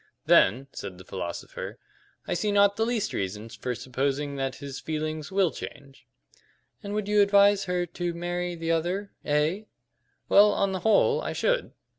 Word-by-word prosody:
"Then," 130 +3 +5
said 95 - -7
the 90 - -12
philosopher, 90 -3 -6 0.5
"I - - -1
see 190 +4 0
not 200 0 +4
the 225 +1 0
least 225 -3 -1
reason 105 +3 -4
for 120 +2 -4
supposing 135 +3 -2
that 135 -1 -2
his 140 -1 -7
feelings 155 0 -4
will 190 -3 +2
change." 140 -2 -10 0.7
"And 205 0 -5
would 210 -1 -2
you 210 0 +4
advise 200 0 +5
her 180 -1 0
to 175 0 -4
marry 175 +1 -3
the 165 0 -2
other 180 +5 -1
A?" 155 +8 0 0.6
"Well, 205 +1 +6
on 195 -1 +1
the 190 - -2
whole, 210 +2 +3
I - - -3
should. - - 0
175 Hz, 165 wpm, -27 LUFS, 140-200 Hz, 0.7 s, Well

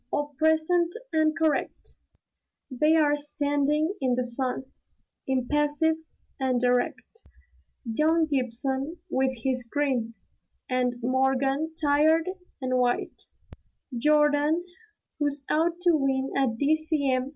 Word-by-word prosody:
All 290 0 -2
present 320 +2 +2 0.2
and 315 -1 +2
correct." 315 -3 -1 0.7
They're 300 +2 +3
standing 290 +2 0
in 255 -2 +2
the 250 0 -1
sun, 250 +1 -3 0.6
impassive 295 +4 +1 0.4
and 260 -2 +1
erect. 250 - -1 0.6
Young 310 +8 +2
Gibson 270 +2 -2
with 260 -1 0
his 260 -2 0
grin; 245 -2 -1 0.5
and 250 -1 0
Morgan, 270 +4 +1
tired 310 +3 +3 0.3
and 255 -1 0
white; 245 -1 -1 0.7
Jordan, 300 +4 +3 0.5
who's 290 -2 0
out 335 +2 +1
to 355 -1 +4
win 270 -2 0
a 275 -1 +3
D.C.M. 280 0 0
285 Hz, 100 wpm, -26 LUFS, 260-310 Hz, 0.7 s, to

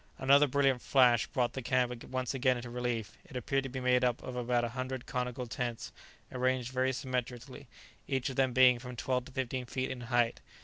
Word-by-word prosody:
Another 140 +2 +5
brilliant 135 -2 +2
flash 125 -4 +4
brought 125 -2 0
the 130 - -4
camp 125 -1 0
once 130 -1 -3
again 130 -1 +2
into 120 0 -7
relief; 120 -3 -3
it 170 -8 -15
appeared 135 +3 0
to - - -4
be 130 +1 -5
made 125 0 +2
up 125 -1 0
of 130 - -6
about 120 0 0
a 120 - -1
hundred 130 +1 -5
conical 125 0 -3
tents, 120 0 -4 0.4
arranged 130 -1 0
very 130 0 +1
symmetrically, 125 0 -5 0.4
each 130 -2 -1
of - - -8
them 130 -1 +2
being 125 -1 +6
from 125 0 -8
twelve 125 +1 -1
to - - -12
fifteen 130 -1 -3
feet 130 +2 -2
in 130 -1 -6
height. 120 -1 +1
125 Hz, 205 wpm, -31 LUFS, 120-130 Hz, 0.4 s, being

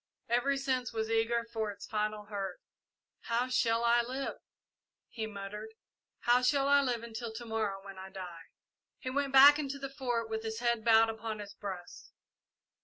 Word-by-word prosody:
Every 245 +4 +2
sense 260 -2 -1
was 220 -1 -2
eager 230 +1 +1
for 220 -2 -1
its 200 0 -8
final 215 -1 -2
hurt. 200 -3 -4 0.6
"How 235 +2 -1
shall 230 -2 +2
I 235 0 +5
live!" 260 +3 -4 0.7
he 220 -2 -4
muttered. 210 +2 -7 0.5
"How 240 +1 +4
shall 275 +2 +3
I 285 0 +6
live 245 -4 -1
until 230 0 -5
to 235 +2 -7
morrow, 215 -3 -2
when 195 -1 -9
I 190 0 -8
die!" 180 -4 -8 0.5
He 255 - -5
went 280 0 0
back 280 +2 +9
into 280 -1 -3
the 275 0 -5
Fort 245 -4 -1
with 220 0 -3
his 220 0 -4
head 235 -1 0
bowed 225 0 +6
upon 220 0 -5
his 205 -1 -8
breast. 185 -3 -8
225 Hz, 175 wpm, -32 LUFS, 210-250 Hz, 0.7 s, back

